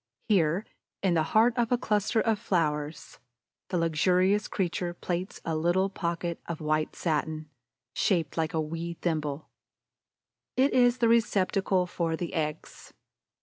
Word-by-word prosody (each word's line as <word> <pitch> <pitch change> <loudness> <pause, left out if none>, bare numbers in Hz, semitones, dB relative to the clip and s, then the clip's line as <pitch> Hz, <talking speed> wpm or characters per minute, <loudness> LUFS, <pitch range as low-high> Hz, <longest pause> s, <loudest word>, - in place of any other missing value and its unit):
Here, 180 -1 +2 0.4
in 190 -3 +3
the 165 - +3 0.2
heart 230 +2 +5
of 235 0 +1
a 245 - +4
cluster 215 -1 +1
of 220 -2 +1
flowers, 155 -7 -2 0.5
the 180 - 0
luxurious 180 +5 +2
creature 175 -2 -2
plaits 180 +1 -4
a 165 - -1
little 175 +5 +1
pocket 170 -2 -3
of 170 -2 -4
white 155 0 -1
satin, 155 -1 -2 0.4
shaped 170 -7 +1
like 160 -1 -1
a - - +1
wee 165 +2 -4
thimble. 155 -3 -2 1.1
It 270 +2 +3
is 245 -1 +4
the 235 - +3
receptacle 195 -4 +2
for 170 -2 -2
the 170 0 -5
eggs. 155 -1 -4
175 Hz, 140 wpm, -28 LUFS, 160-195 Hz, 1.1 s, heart